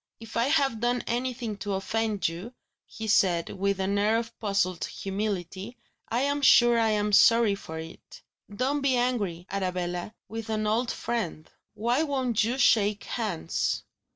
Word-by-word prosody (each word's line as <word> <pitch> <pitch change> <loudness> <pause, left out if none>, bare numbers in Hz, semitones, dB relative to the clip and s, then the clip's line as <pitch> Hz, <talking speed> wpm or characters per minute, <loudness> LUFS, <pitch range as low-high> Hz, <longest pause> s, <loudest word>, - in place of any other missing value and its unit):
"If 225 0 -11
I 230 - +2
have 275 -6 +2
done 240 +1 0
anything 240 -2 -2
to 205 0 -3
offend 215 +1 -1
you," 180 +9 -7 0.3
he 220 - -7
said, 180 -5 +2
with 200 0 -1
an 195 +1 0
air 215 +2 +3
of 230 0 -4
puzzled 195 -4 0
humility, 195 +2 -4 0.3
"I'm 280 +5 0
sure 240 -3 +6
I 225 -1 +3
am 210 -1 0
sorry 230 0 +6
for 160 -5 -7
it. 160 +1 -10 0.3
Don't 265 +7 -1
be 275 -2 +2
angry, 215 -9 -1
Arabella, 180 0 -3
with 225 0 -6
an 215 -1 -1
old 225 +3 +1
friend. 185 -10 -3 0.3
Why 235 +6 +1
won't 260 -8 0
you 240 +4 -1
shake 210 -5 +3
hands?" 200 -9 -2
220 Hz, 155 wpm, -27 LUFS, 195-240 Hz, 0.3 s, sure